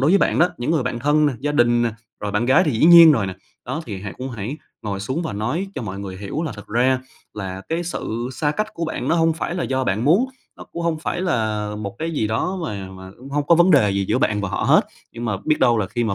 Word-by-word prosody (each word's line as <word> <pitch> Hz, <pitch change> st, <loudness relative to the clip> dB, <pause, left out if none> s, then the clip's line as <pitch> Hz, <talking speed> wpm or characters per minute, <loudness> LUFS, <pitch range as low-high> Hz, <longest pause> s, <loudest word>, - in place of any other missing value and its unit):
đối 140 Hz, +5 st, +3 dB
với 200 Hz, -, +5 dB
bạn -, -, +1 dB
đó, 175 Hz, +2 st, +5 dB
những 120 Hz, +6 st, -2 dB
người 155 Hz, -5 st, +2 dB
bạn 125 Hz, -1 st, -3 dB
thân, 150 Hz, +3 st, +3 dB
gia 145 Hz, +4 st, -2 dB
đình 120 Hz, -3 st, +3 dB
nè, 115 Hz, -2 st, 0 dB, 0.3 s
rồi 105 Hz, -1 st, -3 dB
bạn 110 Hz, +4 st, 0 dB
gái 130 Hz, -, +5 dB
thì 150 Hz, -, +1 dB
dĩ 115 Hz, +5 st, +1 dB
nhiên 170 Hz, -2 st, +10 dB
rồi 110 Hz, -8 st, +1 dB
nè. 95 Hz, -, -5 dB, 0.3 s
Đó 135 Hz, +6 st, -4 dB
thì 100 Hz, -4 st, -6 dB
hãy 100 Hz, -2 st, -5 dB
cũng 130 Hz, +1 st, -5 dB
hãy 120 Hz, +5 st, -5 dB, 0.3 s
ngồi 100 Hz, -2 st, -3 dB
xuống 130 Hz, -, -2 dB
và 160 Hz, -, -4 dB
nói 125 Hz, -, -2 dB
cho -, -, -4 dB
mọi 100 Hz, -2 st, -5 dB
người 95 Hz, -2 st, -6 dB
hiểu 105 Hz, -, -4 dB
là 160 Hz, -, -3 dB
thực 105 Hz, -2 st, -11 dB
ra 125 Hz, +3 st, +2 dB, 0.3 s
là 95 Hz, -2 st, -5 dB
cái 165 Hz, +2 st, -1 dB
sự 120 Hz, -7 st, -4 dB
xa 150 Hz, +1 st, 0 dB
cách 215 Hz, +6 st, -3 dB
của 165 Hz, -, -3 dB
bạn 150 Hz, -4 st, -3 dB
nó 165 Hz, -, +3 dB
hông 165 Hz, -1 st, +3 dB
phải 170 Hz, +2 st, -4 dB
là 180 Hz, -, -2 dB
do 130 Hz, -1 st, -1 dB
bạn 105 Hz, +5 st, 0 dB
muốn, 185 Hz, -, +4 dB, 0.3 s
nó -, -, -10 dB
cũng 170 Hz, -, -4 dB
hông 165 Hz, -2 st, 0 dB
phải 175 Hz, -, -3 dB
là 110 Hz, -, -1 dB
một 105 Hz, +2 st, -6 dB
cái 165 Hz, +1 st, -2 dB
gì 140 Hz, -9 st, -1 dB
đó 145 Hz, -, -1 dB
mà 100 Hz, -8 st, -5 dB
mà 95 Hz, 0 st, -11 dB
cũng 130 Hz, +2 st, -11 dB
hông 145 Hz, 0 st, -1 dB
có 170 Hz, -, +6 dB
vấn 175 Hz, +2 st, +5 dB
đề 125 Hz, -, +5 dB
gì 100 Hz, 0 st, 0 dB
giữa -, -, +2 dB
bạn 105 Hz, -1 st, +1 dB
và 100 Hz, -, -2 dB
họ 95 Hz, -, -2 dB
hết, -, -, +4 dB, 0.3 s
nhưng 120 Hz, +1 st, -6 dB
mà 105 Hz, -4 st, -1 dB
biết 155 Hz, -1 st, +2 dB
đâu 120 Hz, -3 st, +4 dB
là 100 Hz, -, 0 dB
khi 120 Hz, +4 st, -2 dB
mà 110 Hz, -, 0 dB
125 Hz, 290 wpm, -21 LUFS, 105-160 Hz, 0.3 s, nhiên